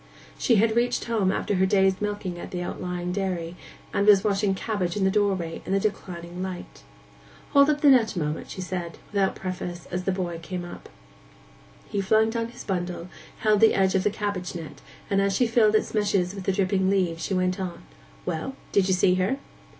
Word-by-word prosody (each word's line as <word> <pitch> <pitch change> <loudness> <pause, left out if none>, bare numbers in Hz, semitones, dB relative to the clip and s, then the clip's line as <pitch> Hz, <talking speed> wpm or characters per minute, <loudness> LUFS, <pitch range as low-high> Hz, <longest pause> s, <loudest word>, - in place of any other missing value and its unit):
She 235 - +2
had 220 +1 +3
reached 245 +1 +1
home 215 -5 +1
after 205 - -1
her 190 +1 +3
day's 190 -1 +3
milking 205 -4 -3
at - - -7
the 180 -1 -4
outlying 180 0 -4
dairy, 180 -3 -2 0.4
and 200 - +1
was 200 -2 +7
washing 200 -2 +1
cabbage 190 -4 -2
at 200 - 0
the 190 - +3
doorway 190 -5 0
in 190 - -3
the 195 - +3
declining 180 -4 -4
light. 185 -1 -6 0.7
'Hold 280 0 +6
up 295 -1 +1
the 290 - +6
net 230 -5 +4
a - - -1
moment,' 150 0 -3
she 185 - -6
said, 180 -3 -4
without 195 -2 +1
preface, 180 -2 -5
as 180 +1 -3
the 190 - +2
boy 175 -3 -3
came 180 +1 -5
up. 175 - -10 1.0
He 205 -2 -1
flung 220 +3 +3
down 230 0 -2
his 240 +1 -11
bundle, 180 -2 -3 0.3
held 215 -1 +4
the 225 +1 +6
edge 190 -1 +3
of 190 - +2
the - - +3
cabbage 200 -4 -3
net, 160 -4 -8 0.3
and 195 -1 +2
as 195 -1 +1
she 250 - +3
filled 225 -2 +4
its 215 - +1
meshes 200 -4 +1
with 195 -2 -7
the - - +2
dripping 190 0 +1
leaves 180 -4 0
she 195 - -1
went 185 0 0
on, 185 -2 -5 0.4
'Well, 165 +12 -3 0.2
did 195 -2 +3
you 190 - +3
see 180 0 +4
her? 240 +9 +1
190 Hz, 205 wpm, -26 LUFS, 180-210 Hz, 1.0 s, was